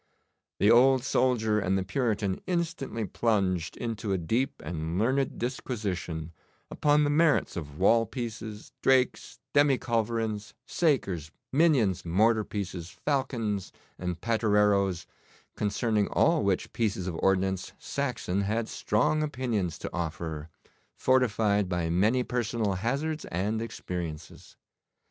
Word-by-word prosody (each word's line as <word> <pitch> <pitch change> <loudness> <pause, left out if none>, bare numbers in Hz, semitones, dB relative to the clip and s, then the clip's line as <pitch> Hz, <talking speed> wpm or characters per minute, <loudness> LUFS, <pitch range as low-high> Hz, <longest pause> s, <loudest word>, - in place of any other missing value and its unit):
The 105 - +5
old 130 +1 +6
soldier 115 -5 +2
and 95 -1 +1
the 95 - 0
Puritan 105 -2 -1
instantly 165 -10 -2
plunged 95 -6 0
into 110 -3 -3
a - - +1
deep 115 +11 -1
and 80 +1 -3
learned 130 +6 +1
disquisition 95 - -3 0.4
upon 150 0 +3
the 145 - +2
merits 160 +1 +3
of 75 -5 -6
wall 115 +5 +4
pieces, 110 -3 -6
drakes, 130 -1 +2 0.2
demi 145 -2 +5
culverins, 115 -3 -2
sakers, 100 - 0 0.2
minions, 130 - +3
mortar 110 +6 +3
pieces, 95 -5 -5
falcons, 120 -9 -2 0.3
and 90 -1 -3
pattereroes, 105 -5 +2 0.5
concerning 105 0 0
all 165 -2 +3
which 100 -2 0
pieces 105 -5 -1
of 90 - -3
ordnance 95 0 0
Saxon 125 -9 -2
had 110 +3 -1
strong 135 +10 +1
opinions 120 - -1
to - - -5
offer, 80 -2 -4 0.5
fortified 105 -6 +2
by 85 -2 -1
many 110 +9 +3
personal 115 -4 -1
hazards 140 - -2
and 105 +6 -1
experiences. 85 -8 -6
110 Hz, 115 wpm, -28 LUFS, 95-125 Hz, 0.5 s, old